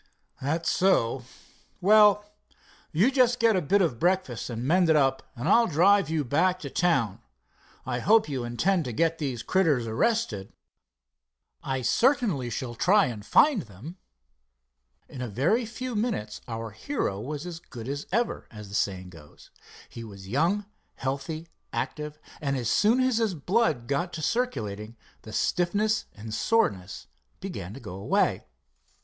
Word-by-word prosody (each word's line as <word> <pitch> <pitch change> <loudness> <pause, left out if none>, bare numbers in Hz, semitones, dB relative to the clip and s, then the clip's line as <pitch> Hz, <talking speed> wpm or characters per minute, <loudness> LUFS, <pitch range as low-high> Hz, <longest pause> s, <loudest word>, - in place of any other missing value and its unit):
"That's 160 +5 0
so. 135 -10 +2 0.5
Well, 210 +1 +5 0.7
you 195 - +3
just 250 -2 +3
get 230 -2 +4
a 185 - +2
bit 195 +6 +3
of 125 -10 -1
breakfast 175 -10 0
and 115 0 -4
mended 165 +3 +3
up, 135 -2 +2
and 125 +5 -4
I'll 230 +4 +5
drive 185 +4 +4
you 160 -2 0
back 170 +8 +2
to - - -6
town. 120 - +1 0.6
I 125 -1 -2
hope 215 - +4
you 135 -4 -3
intend 160 +9 0
to 125 - -4
get 165 +5 +1
those 130 -6 -3
critters 155 -11 +2
arrested." 115 - -1 1.1
"I 130 -1 -3
certainly 220 - +2
shall 120 +1 -4
try 195 - +4
and 110 -5 -5
find 255 - +4
them," 120 - -11 1.0
said - - -41
Dave. - - -13
In - - -5
a 125 - -3
very 170 - +1
few 250 +1 -5
minutes 205 - -2
our 115 -1 -5
hero 105 - -3
was 150 +5 -5
as 170 -2 -6
good 120 -8 -10
as 140 +2 -4
ever, 235 +4 -1
as 105 -3 -10
the - - -11
saying 95 -3 -2
goes. 75 -4 -16 0.4
He 115 - -9
was 100 -4 -11
young, 170 - +1 0.3
healthy, 140 +5 -4 0.2
active, 150 0 -4 0.2
and 140 -2 -1
as 120 -3 -1
soon 230 +5 +4
as 255 -3 +2
his 220 -5 0
blood 160 - +1
got 170 +6 -1
to 155 - -5
circulating, 115 - -2 0.2
the 110 - -11
stiffness 205 - +1
and 110 +1 -8
soreness 100 - 0 0.3
began 90 +5 -6
to - - -8
go 90 - -8
away. 95 +2 0
150 Hz, 155 wpm, -27 LUFS, -, 1.1 s, Well